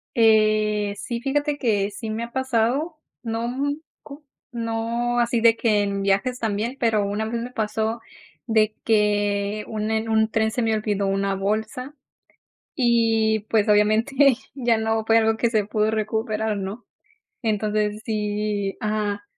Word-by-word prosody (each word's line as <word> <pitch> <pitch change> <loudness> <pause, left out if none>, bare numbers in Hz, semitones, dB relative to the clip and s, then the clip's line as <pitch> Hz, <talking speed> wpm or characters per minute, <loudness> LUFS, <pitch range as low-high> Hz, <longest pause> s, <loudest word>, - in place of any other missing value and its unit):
Eh, 215 -2 +3
sí, 235 +2 -4
fíjate 290 +2 0
que 205 -6 +1
sí 220 +2 -6
me 220 +2 -3
ha 235 - -7
pasado. 260 +5 0 0.3
No 230 +1 -2 0.5
co 290 +1 -12 0.3
no 235 +1 -1
así 235 -1 +1
de 230 0 +6
que 215 -3 +2
en 200 0 -2
viajes 200 +6 0
también, 225 +4 -2
pero 220 -4 +2
una 205 +2 -2
vez 230 +1 -3
me 245 +2 -6
pasó 220 0 -2 0.5
de 220 -2 +2
que, 205 -1 +1
un 215 0 -3
en 220 0 -1
un 220 0 +3
tren 220 0 +1
se 245 - -2
me 225 -1 +1
olvidó 205 -2 -1
una 195 0 0
bolsa. 220 +7 -3 0.9
Y, 225 -3 +3
pues, 220 -1 +2
obviamente 215 +5 +3 0.4
ya 240 -4 +1
no 220 0 0
fue 225 +1 +4
algo 220 0 +3
que 235 +1 +1
se 215 -3 +1
pudo 215 +1 0
recuperar, 220 0 -1
¿no? 200 +4 -6 0.6
Entonces 210 -1 -1
sí, 210 -2 -2
ajá, 210 -1 -2
220 Hz, 150 wpm, -23 LUFS, 210-230 Hz, 0.9 s, de